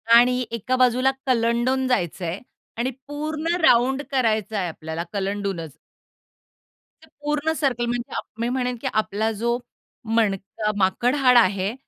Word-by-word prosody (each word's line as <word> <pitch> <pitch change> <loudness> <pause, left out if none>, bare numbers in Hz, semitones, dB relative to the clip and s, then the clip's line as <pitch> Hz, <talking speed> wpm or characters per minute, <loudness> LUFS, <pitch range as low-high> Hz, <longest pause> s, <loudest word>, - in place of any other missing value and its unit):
आणि 250 +1 +5
एका 235 +3 -1
बाजूला 255 +1 +3 0.2
कलंडून 245 +2 +2
जायचंय 180 -5 -1 0.4
आणि 245 +3 0 0.2
पूर्ण 310 +3 -2
राउंड 265 -1 +4
करायचंय 220 -6 0
आपल्याला 160 0 -5
कलंडूनच. 195 -5 -3 1.3
ते - - -17
पूर्ण 295 +1 0
सर्कल 250 -5 +1
म्हणजे 240 0 -3
आप - - -3
मी 235 +1 0
म्हणेन 250 -1 -1
की - - -2
आपला 215 +1 0
जो 235 +1 +1 0.6
मणका 210 -1 0
माकड 200 +7 +2
हाड 255 -3 +5
आहे, 195 -2 +3
235 Hz, 125 wpm, -23 LUFS, 200-255 Hz, 1.3 s, आणि